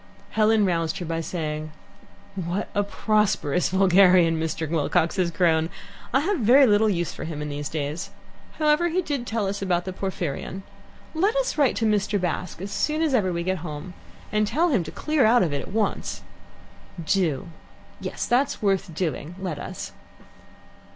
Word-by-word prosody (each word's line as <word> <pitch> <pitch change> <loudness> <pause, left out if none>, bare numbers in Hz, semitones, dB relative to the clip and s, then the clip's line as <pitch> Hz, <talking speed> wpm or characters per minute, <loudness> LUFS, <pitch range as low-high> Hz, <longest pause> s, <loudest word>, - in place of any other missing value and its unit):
Helen 215 -1 +3
roused 165 -1 0
her 180 - -5
by 165 0 -2
saying: 155 -2 -4 0.6
"What 185 +1 -3
a 205 - +2
prosperous 205 -6 +1
vulgarian 185 -3 +5
Mr. 160 0 -2
Wilcox 160 +1 +1
has 180 -2 +2
grown! 165 -2 +2 0.4
I 265 - +3
have 375 +3 0
very 255 +5 +6
little 215 -1 +4
use 175 -4 -1
for - - -7
him 160 -2 -5
in 150 0 -4
these 145 0 -4
days. 150 +1 -3 0.4
However, 305 +2 +2
he 355 +2 0
did 280 -6 -3
tell 220 -2 -1
us 195 +1 -3
about 175 -2 0
the 185 - -4
Porphyrion. 190 -1 -4 0.5
Let 390 +8 +1
us - - 0
write 285 -4 +3
to 225 - 0
Mr. 210 -1 +1
Bast 180 -1 -3
as 200 - -5
soon 310 +1 0
as 310 -4 +1
ever 200 -7 +2
we 170 0 -2
get 185 0 -1
home, 155 +2 -7 0.4
and 210 0 +2
tell 315 +11 +2
him 235 - +2
to 160 - -7
clear 305 -3 +1
out 235 +1 +5
of 160 -5 -1
it 140 - -1
at - - -9
once." 215 +1 -2 0.8
"Do; 170 -4 0 0.5
yes, - - -4
that's 260 +4 +1
worth 195 -5 0
doing. 165 -1 -3
Let 175 -6 -4
us." - - -6
190 Hz, 175 wpm, -24 LUFS, 165-220 Hz, 0.8 s, very